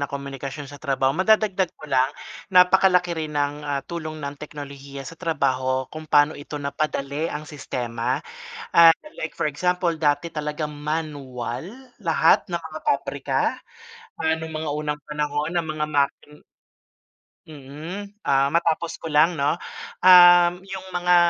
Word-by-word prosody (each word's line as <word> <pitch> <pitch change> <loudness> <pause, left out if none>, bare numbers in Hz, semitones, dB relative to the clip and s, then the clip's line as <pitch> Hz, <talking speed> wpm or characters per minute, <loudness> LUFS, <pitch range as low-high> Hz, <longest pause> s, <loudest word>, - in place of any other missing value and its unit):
ng 140 - -2
komunikasyon 140 +1 -6
sa 145 +1 -12
trabaho. 135 -2 +1
Madadagdag 195 +1 +2
ko - - -12
lang, 130 -2 +2 0.4
napakalaki 180 -1 +5
rin 155 -2 -4
ng, 145 +1 -1
ah, 145 -1 -2
tulong 160 -2 -6
ng 140 -2 -5
teknolohiya 140 -2 -8
sa 165 - -8
trabaho 130 -6 0
kung 155 0 -8
paano 145 +1 +5
ito 145 +1 -8
napadali 145 +1 -2
ang 150 +1 -5
sistema, 125 -4 -3 0.6
ah, 170 -1 +9 0.3
like 160 - -5
for 170 - -1
example 175 +3 0
dati 150 +2 +1
talagang 150 0 -3
manual 145 -4 -4 0.3
lahat - - +3
ng - - -1
mga - - -7
pabrika. 445 - -1 0.8
Ah, 160 - +1
no'ng 160 0 -3
mga 155 0 -3
unang 150 -1 -3
panahon 150 +1 -2
ng 165 - -7
mga 150 - -1
makin 145 +1 0 1.1
mm, 160 +9 -9
ah, 135 0 +3
matapos 170 0 +1
ko 165 - -5
lang 160 +4 +4
'no? 145 +3 0 0.4
Um, 175 0 +7
'yong 190 -1 -8
mga 180 0 +3
150 Hz, 140 wpm, -23 LUFS, 140-170 Hz, 1.1 s, ah